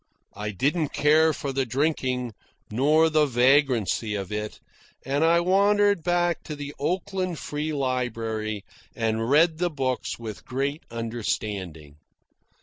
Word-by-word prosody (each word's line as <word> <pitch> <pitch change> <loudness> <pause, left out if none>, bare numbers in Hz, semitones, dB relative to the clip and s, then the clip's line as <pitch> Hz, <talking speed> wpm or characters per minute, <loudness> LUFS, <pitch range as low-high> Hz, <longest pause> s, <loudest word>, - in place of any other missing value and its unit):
I 105 +1 -4
didn't 145 - 0
care 155 +2 +4
for 140 -2 -4
the 135 0 +1
drinking, 130 -2 -1 0.4
nor 150 +8 +4
the 155 -1 +3
vagrancy 125 -4 +2
of 100 -1 -5
it, 105 0 -4 0.5
and 140 +3 0
I 170 +1 +4
wandered 200 +1 +3
back 175 -1 +1
to 150 - -5
the 145 0 -7
Oakland 185 +3 -2
Free 150 +1 -3
Library 115 -6 -2 0.3
and 115 0 -1
read 160 +3 +4
the 175 0 +1
books 130 -5 -2
with 110 -3 -8
greater 140 +4 -3
understanding. 105 -9 -4
135 Hz, 130 wpm, -25 LUFS, 115-160 Hz, 0.5 s, care